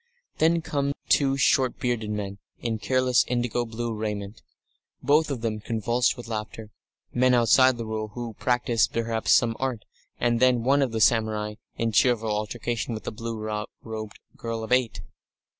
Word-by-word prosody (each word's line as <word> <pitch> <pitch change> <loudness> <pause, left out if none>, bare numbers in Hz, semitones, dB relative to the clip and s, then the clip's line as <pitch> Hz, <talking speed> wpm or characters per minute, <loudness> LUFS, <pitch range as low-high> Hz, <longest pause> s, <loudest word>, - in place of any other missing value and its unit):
Then 165 +1 +3
come 140 -2 -1 0.2
two 135 -1 +3
short 130 -2 +2
bearded 120 -4 -2
men 100 -1 -4 0.2
in 115 -2 -3
careless 130 +2 +2
indigo 120 -1 -1
blue 115 0 -4
raiment, 105 -1 -4 0.6
both 150 +4 +3
of 135 -5 -3
them 110 -2 -2
convulsed 115 +2 0
with 120 - -9
laughter 110 -1 -6 0.4
men 125 0 +4
outside 125 +2 +5
the 115 - -4
Rule, 110 0 -3
who 120 -2 -5
practise, 120 -3 +2
perhaps, 115 -1 -1
some 115 -1 +4
art 130 -5 -3 0.3
and 120 -1 +1
then 125 -2 +3
one 140 +3 +3
of 135 -4 +1
the 110 -1 -2
samurai, 110 -2 +2 0.2
in 115 0 0
cheerful 115 0 +2
altercation 110 +2 -2
with 110 - -8
a - - -3
blue 115 0 -5 0.5
robed 110 -1 -6 0.2
girl 115 -1 -4
of 110 - -7
eight. 125 -2 +2
115 Hz, 160 wpm, -26 LUFS, 110-125 Hz, 0.6 s, outside